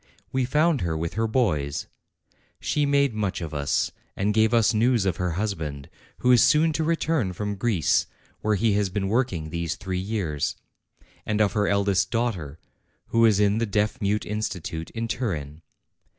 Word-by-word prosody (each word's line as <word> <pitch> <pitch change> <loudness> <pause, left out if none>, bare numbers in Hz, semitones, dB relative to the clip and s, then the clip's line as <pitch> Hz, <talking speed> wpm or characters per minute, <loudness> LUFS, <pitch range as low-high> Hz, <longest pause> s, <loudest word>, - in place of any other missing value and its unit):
We 130 -1 +1
found 150 +2 +2
her 80 -2 -1
with 80 +1 -3
her 115 +1 0
boys: 75 - 0 0.7
she 145 -1 0
made 140 -3 +3
much 105 -3 -2
of 80 -3 -6
us 70 -1 0 0.2
and 100 +2 0
gave 110 0 +3
us 115 -2 +4
news 115 -1 +2
of 90 -3 0
her 90 -2 -1
husband, 80 -8 -4 0.3
who 125 - +3
is 125 - +6
soon 155 +4 +4
to 160 - 0
return 160 - 0
from 105 +3 -3
Greece, 100 -4 +1 0.3
where 110 0 +1
he 110 +1 +2
has 100 -1 +1
been 95 0 -2
working 100 -10 -1
these 85 -1 -2
three 95 -2 -4
years; 95 -7 -2 0.7
and 110 -1 -1
of 105 -3 +3
her 105 -1 +1
eldest 100 -1 +2
daughter, 95 - -2 0.5
who 115 0 +5
is 105 -3 +3
in 105 +1 +3
the 115 - 0
Deaf 105 +2 0
mute 105 +1 0
Institute 90 -6 -4
in 115 0 -4
Turin. 80 - -3
105 Hz, 175 wpm, -25 LUFS, 90-115 Hz, 0.7 s, is